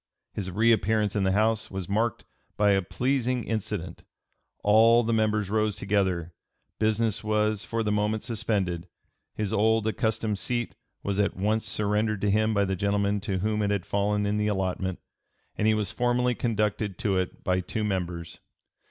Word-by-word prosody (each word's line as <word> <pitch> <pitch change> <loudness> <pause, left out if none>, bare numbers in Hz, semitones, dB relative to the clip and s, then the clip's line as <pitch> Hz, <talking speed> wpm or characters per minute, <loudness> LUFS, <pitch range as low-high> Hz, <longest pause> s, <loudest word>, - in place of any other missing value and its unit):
His 95 -3 -3
reappearance 110 0 +2
in 100 -2 +1
the 95 - +2
House 110 +2 +1
was 95 -2 -5
marked 110 +3 -1 0.3
by 105 -1 +4
a 95 -1 +3
pleasing 125 +4 -1
incident: 100 -5 -4 0.6
all 115 +3 +6
the 115 +1 0
members 110 -2 +1
rose 110 -1 +1
together; 95 -4 0 0.5
business 110 0 +1
was 105 -1 +1
for 115 0 -2
the 105 - 0
moment 105 +1 0
suspended; 105 -7 -1 0.5
his 105 0 -2
old 110 +1 +3
accustomed 110 -1 -1
seat 120 -1 -2 0.3
was 100 0 -1
at 100 -3 +1
once 110 +3 0
surrendered 105 0 0
to 100 - +2
him 110 +2 +2
by 100 -2 +2
the 95 0 -1
gentleman 100 +1 0
to 95 -1 -2
whom 105 +1 0
it 100 - +1
had 100 -3 -1
fallen 105 +1 0
in 105 +1 0
the 105 0 +1
allotment, 95 -2 -1 0.6
and 105 - +1
he 110 - +4
was 105 -3 -1
formally 125 0 +1
conducted 105 -4 -1
to 105 -6 0
it 90 - -4
by 90 -1 +1
two 105 +4 -3
members. 90 -4 -3
105 Hz, 170 wpm, -27 LUFS, 100-110 Hz, 0.6 s, all